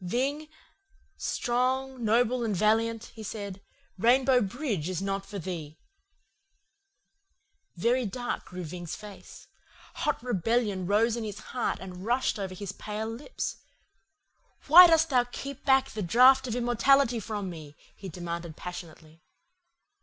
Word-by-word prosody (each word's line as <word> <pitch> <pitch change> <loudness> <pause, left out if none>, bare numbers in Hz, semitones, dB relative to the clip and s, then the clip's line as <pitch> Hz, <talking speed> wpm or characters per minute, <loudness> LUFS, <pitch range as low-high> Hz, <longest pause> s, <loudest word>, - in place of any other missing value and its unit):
"'Ving, 275 +11 -1 0.7
strong, 255 +1 -1
noble, 240 +2 +2
and 215 -3 -1
valiant,' 225 +3 +1
he 225 - -10
said, 200 -2 -6 0.4
'Rainbow 250 +3 +4
Bridge 205 - -2
is 185 -3 -2
not 195 0 -3
for 205 - -7
thee.' 165 -4 -6 2.0
"Very 235 +6 +1
dark 245 +5 -4
grew 180 0 -7
Ving's 175 +1 -6
face. 210 -1 -12 0.5
Hot 295 - 0
rebellion 215 -4 0
rose 220 +3 +2
in 235 - -4
his 210 -2 -5 0.2
heart 250 - -1
and 185 -1 -9
rushed 240 0 0
over 190 -2 -4
his 200 0 -5
pale 215 +2 -5
lips. 245 - -5 1.1
"'Why 350 +5 +10
dost 325 -1 +3
thou 250 -2 +4
keep 270 +2 -8
back 270 0 +3
the 215 - -5
draught 255 +8 +5
of 235 - -2
immortality 245 +1 +3
from 205 -3 -4
me?' 155 -3 -10 0.2
he 195 - -8
demanded 170 -1 -6
passionately. 165 -2 -9
220 Hz, 130 wpm, -28 LUFS, 185-250 Hz, 2.0 s, Why